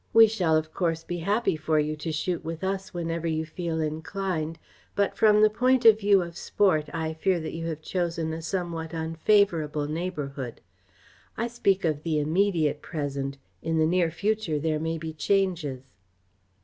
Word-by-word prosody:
We 225 0 +9
shall, 180 -8 +2
of 155 0 -3
course, 165 -3 -1
be 175 - -4
happy 205 +3 +1
for 155 0 0
you 150 +1 0
to 160 +2 -4
shoot 165 +3 -2
with 165 +2 -5
us, 195 +1 -2
whenever 170 -2 -3
you 160 0 -1
feel 165 0 -3
inclined, 160 +1 -2 0.4
but 200 -1 +1
from 210 -1 +5
the 215 - +7
point 255 +3 +2
of 220 -1 +8
view 200 -3 +4
of 170 -1 -8
sport 165 -6 +1
I 160 -1 -2
fear 175 +3 +1
that 155 - -5
you 165 0 -4
have 155 -1 -5
chosen 165 -3 -2
a 165 - -5
somewhat 165 -2 -3
unfavourable 160 -2 +2
neighbourhood. 145 -6 -4 0.8
I 235 - 0
speak 195 -6 +1
of 155 -2 0
the 155 -2 0
immediate 160 -1 +1
present. 140 -3 -4 0.2
In 165 0 -1
the 155 - +4
near 170 0 +2
future 205 -1 -1
there 155 +1 0
may 165 +1 -2
be 160 0 -6
changes." 160 -7 0
165 Hz, 175 wpm, -27 LUFS, 155-190 Hz, 0.8 s, We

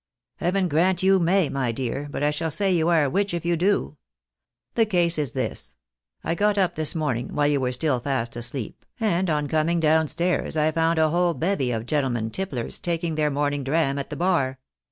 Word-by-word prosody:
" - - -66
Heaven 185 +1 0
grant 175 +3 +2
you 190 0 +5
may, 180 0 +3
my 130 -4 -1
dear, 130 +4 -3
but 145 - -4
I 150 - +3
shall 160 +2 -2
say 195 +5 0
you 165 -1 +2
are 165 -3 +4
a 140 - +1
witch 195 0 0
if 170 - -4
you 170 0 +2
do. 180 -3 0 0.8
The 225 -2 +2
case 175 -5 +2
is 145 -4 -1
this: 125 - -4 0.5
I 165 - 0
got 205 +3 +1
up 190 -3 +2
this 155 0 0
morning, 130 -7 -1
whUe 145 0 +1
you 140 -2 +1
were 125 -1 0
still 130 0 0
fast 120 -2 -2
asleep, 120 0 -5 0.2
and 190 -5 +1
on 150 -2 0
coming 160 +3 +1
down 160 0 +3
stairs 170 0 -1
I 155 +1 +2
found 165 +1 +1
a 155 -1 +3
whole 175 0 +2
bevy 165 -7 0
of 115 -2 -2
gentlemen 125 -6 -1
tipplers 140 - -4
taking 170 -1 -2
their 155 -1 +1
morning 145 0 -1
dram 140 0 +1
at 140 - -5
the - - -5
bar. 165 -8 +1
155 Hz, 215 wpm, -24 LUFS, 140-175 Hz, 0.8 s, you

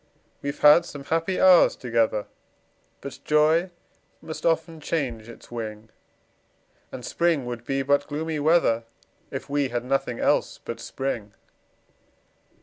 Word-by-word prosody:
We've 140 0 -4
had 150 +3 +8
some 145 -1 -9
happy 165 +5 -1
hours 185 -2 +6
together, 115 -3 0 0.8
But 140 - -8
joy 155 +4 +3 0.5
must 160 +1 -4
often 165 0 0
change 125 -8 -3
its 115 - -14
wing; 110 -2 -6 1.0
And 125 - -7
spring 165 -5 +1
would 120 -1 -5
be 135 0 -1
but 145 +1 +2
gloomy 155 +1 -3
weather, 145 -7 +3 0.4
If 135 - -6
we 140 -1 0
had 120 0 -3
nothing 125 -2 -1
else - - +1
but 115 - -5
spring. 115 -5 -4
140 Hz, 130 wpm, -25 LUFS, 120-160 Hz, 1.0 s, had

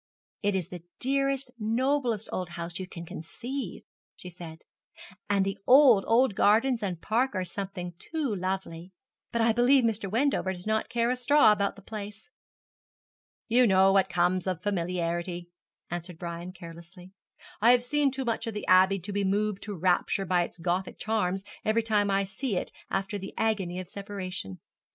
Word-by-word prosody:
'It 205 -1 +1
is 185 -4 -2
the 175 -2 -8 0.2
dearest, 275 0 0
noblest 235 0 0
old 180 -2 -3
house 170 0 -5
you 185 - -5
can 170 -2 -9
conceive,' 245 - -6 0.3
she 180 - -9
said; 165 -2 -10 0.7
'and 200 -1 +2
the 195 - -3
old, 255 -6 +7
old 235 0 +4
gardens 230 +5 +3
and 180 -5 -4
park 240 +1 +1
are 185 -1 -1
something 185 -2 -5
too 305 -8 -3
lovely: 185 -2 -4 0.4
but 235 - 0
I 225 0 +4
believe 250 +3 +4
Mr. 220 -3 0
Wendover 230 -4 +1
does 180 -1 -6
not 220 0 0
care 235 0 +1
a - - +1
straw 265 0 +5
about 200 -1 0
the 200 - -15
place.' 210 0 -8 1.2
'You 245 +1 +5
know 190 -1 +5
what 195 -1 +3
comes 180 +1 +1
of 180 -2 -2
familiarity,' 175 -2 -2 0.4
answered 175 0 -5
Brian, 170 +1 -6
carelessly. 175 +1 -12 0.5
'I 230 - +6
have 245 -1 +4
seen 290 +2 +2
too 265 0 -4
much 230 0 -1
of 225 - -4
the 210 - -4
Abbey 190 +1 +5
to 200 +3 -6
be 200 0 0
moved 205 +1 0
to 205 -2 -6
rapture 185 +2 +1
by 180 -1 +2
its 175 - -5
Gothic 180 +2 -2
charms 195 -4 -1 0.2
every 220 +1 +2
time 210 -2 +1
I 195 0 +2
see 200 +2 -3
it - - -3 0.2
after 195 +1 -2
the 195 - -8
agony 195 -5 0
of 185 - -7
separation.' 185 - -6
195 Hz, 175 wpm, -28 LUFS, 180-230 Hz, 1.2 s, old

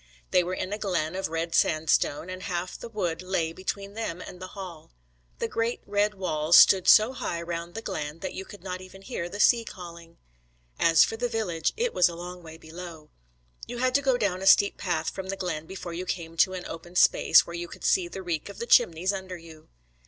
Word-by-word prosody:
They 180 - +4
were 180 +2 -3
in 185 +2 -4
a 210 - -4
glen 180 -5 -1
of 190 - -2
red 165 +1 -3
sandstone, 155 0 +2
and 185 0 -7
half 180 0 -3
the 235 - -8
wood 180 -7 -2
lay 180 -3 -1
between 195 +2 -5
them 210 -6 -4
and 180 - -9
the 185 - -5
Hall. 180 -5 -8 0.5
The - - -2
great 230 +1 -2
red 205 +1 +1
walls 160 -4 +3
stood 190 -2 +7
so 215 +4 +7
high 170 -9 -3
round 170 +1 -5
the 225 - -5
glen 150 -4 -4
that 190 - -4
you 190 - -5
could 200 -1 -13
not 185 -1 -5
even 190 +1 -13
hear 185 -7 -4
the 205 - -7
sea 235 +1 +5
calling. 170 -5 -11 0.6
As 165 -2 +6
for 225 - -2
the 245 +1 -1
village, 180 -8 -1
it 475 +1 0
was 180 - +4
a 170 - -7
long 180 +1 -8
way 160 -1 -11
below. 165 -1 -10 0.6
You 245 - -6
had 255 +1 +1
to 280 - +4
go 265 -3 +2
down 195 -5 -1
a 195 - -1
steep 200 +1 +6
path 165 -4 -2
from 190 -1 -7
the 195 - -3
glen 160 -4 -4
before 185 -2 -7
you 180 +2 -5
came 165 -2 -4
to 185 - +4
an 185 -1 -6
open 175 +2 -9
space, - - +5
where 170 - -9
you 175 0 -4
could - - -12
see 180 -2 +3
the 190 +2 -8
reek 170 0 -3
of 200 - -10
the 235 - -4
chimneys 180 -3 +4
under 190 -2 -6
you. 160 -2 -15
180 Hz, 225 wpm, -27 LUFS, 170-200 Hz, 0.6 s, stood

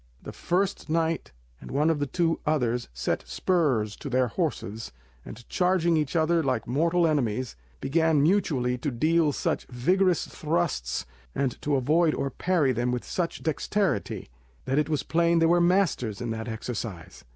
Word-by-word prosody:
The - - -7
first 190 -1 -1
knight 165 0 0 0.3
and - - -11
one 150 +4 +2
of 155 - -1
the 145 - -1
two 165 +3 0
others 125 -6 0
set 60 +1 -2
spurs 135 - +1
to 140 - -6
their 130 -1 +2
horses, 110 +1 -3 0.3
and 115 +2 -11
charging 180 -2 +2
each 150 0 -1
other 165 +1 +3
like 130 -7 -1
mortal 165 +7 +2
enemies, 130 -6 0 0.2
began 160 - +2
mutually 140 -9 +1
to 145 - -1
deal 155 +5 +2
such - - -2
vigorous 180 +8 +2
thrusts, 155 - -2 0.3
and 135 -3 -1
to 145 -1 0
avoid 155 +5 +2
or 140 - -2
parry 170 -6 +1
them 120 0 0
with 125 -1 -2
such 175 -2 -3
dexterity, 165 - -1 0.3
that 135 +3 +1
it 150 - 0
was 150 -3 0
plain 170 +1 +2
they 165 - +4
were 175 +1 +4
masters 175 - +1
in 120 -1 -3
that 110 +1 -4
exercise. 110 -6 -6
150 Hz, 165 wpm, -27 LUFS, 125-170 Hz, 0.3 s, they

